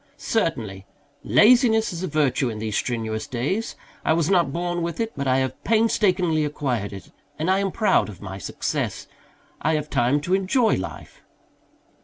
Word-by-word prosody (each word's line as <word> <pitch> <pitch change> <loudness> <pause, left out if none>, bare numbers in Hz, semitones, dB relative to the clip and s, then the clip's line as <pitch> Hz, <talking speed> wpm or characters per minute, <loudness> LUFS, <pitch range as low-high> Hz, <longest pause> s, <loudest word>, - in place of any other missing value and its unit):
"Certainly. 110 - -2 0.4
Laziness 225 -2 +4
is 170 - -5
a 185 - -2
virtue 140 -4 +1
in 110 - -5
these 110 -1 -3
strenuous 110 -3 -2
days, 145 - -2 0.3
I - - +3
was 165 +1 +1
not 175 -7 +3
born 175 +2 -2
with 170 +3 -3
it, 225 -1 -1
but 140 -1 -3
I 130 0 +3
have 130 -1 -2
painstakingly 190 -7 +2
acquired 130 -8 -2
it, 100 -1 -10 0.3
and 160 +4 0
I 190 - +3
am 195 -1 -1
proud 215 - +2
of 100 - -10
my 95 -1 -7
success. - - -3 0.6
I 160 - +1
have 150 0 -3
time 125 +5 +2
to 175 +5 -2
enjoy 205 +4 +2
life." 95 - -7
155 Hz, 170 wpm, -23 LUFS, 120-190 Hz, 0.6 s, Laziness